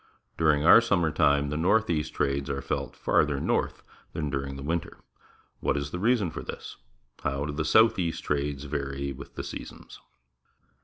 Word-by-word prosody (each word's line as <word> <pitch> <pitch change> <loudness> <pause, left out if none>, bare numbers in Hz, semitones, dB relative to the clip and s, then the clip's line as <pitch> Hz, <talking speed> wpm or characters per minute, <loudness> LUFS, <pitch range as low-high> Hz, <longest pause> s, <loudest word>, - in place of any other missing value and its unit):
During 75 -2 +2
our 115 - +9
summer 90 -8 +1
time 70 -1 +2
the 75 - -2
north 100 +7 +3
east 75 -2 -2
trades 70 0 0
are 70 -1 -3
felt - - -3
farther 70 -2 +1
north - - -1 0.3
than 75 -3 -3
during 70 0 -3
the 70 - -7
winter. 80 +2 -3 0.6
What 70 - 0
is 70 0 -3
the 90 - -4
reason 105 -4 +2
for - - -6
this? - - -8 0.5
How 70 +1 -1
do 75 - -4
the 75 +1 -1
south 110 +8 +4
east 85 -2 -2
trades 70 -1 -2
vary 70 -1 -3
with 70 +1 -10
the - - -4
seasons? - - -9
75 Hz, 175 wpm, -27 LUFS, 70-85 Hz, 0.6 s, our